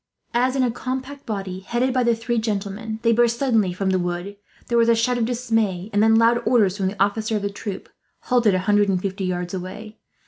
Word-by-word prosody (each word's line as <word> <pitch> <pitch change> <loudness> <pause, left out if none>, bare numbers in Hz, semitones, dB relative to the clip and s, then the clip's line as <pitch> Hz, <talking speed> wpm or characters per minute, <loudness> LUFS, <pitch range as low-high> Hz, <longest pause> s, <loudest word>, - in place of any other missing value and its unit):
As 255 +2 +2
in 265 - +2
a 245 - +1
compact 260 +3 -5
body, 195 -4 -4
headed 240 +6 -1
by 255 - +2
the 235 -1 +3
three 230 +1 -1
gentlemen, 220 0 -3
they 230 - +4
burst 235 0 +3
suddenly 225 -8 +2
from 190 +2 -1
the 185 - +1
wood, 175 +3 -3 0.3
there 235 - +1
was 230 0 +4
a 230 - +5
shout 240 +2 +1
of 230 - +1
dismay; 225 -5 -1
and 205 - +3
then 225 +1 +5
loud 230 +1 +4
orders 220 -5 +3
from 195 -2 -1
the 195 +1 -5
officer 215 +3 +1
of 205 - -2
the 200 - -2
troop, 200 -1 -6 0.3
halted 235 -6 +2
a - - +1
hundred 205 0 +3
and 185 -2 +1
fifty 190 0 -3
yards 180 0 -3
away. 200 +4 -7
220 Hz, 230 wpm, -22 LUFS, 195-235 Hz, 0.3 s, a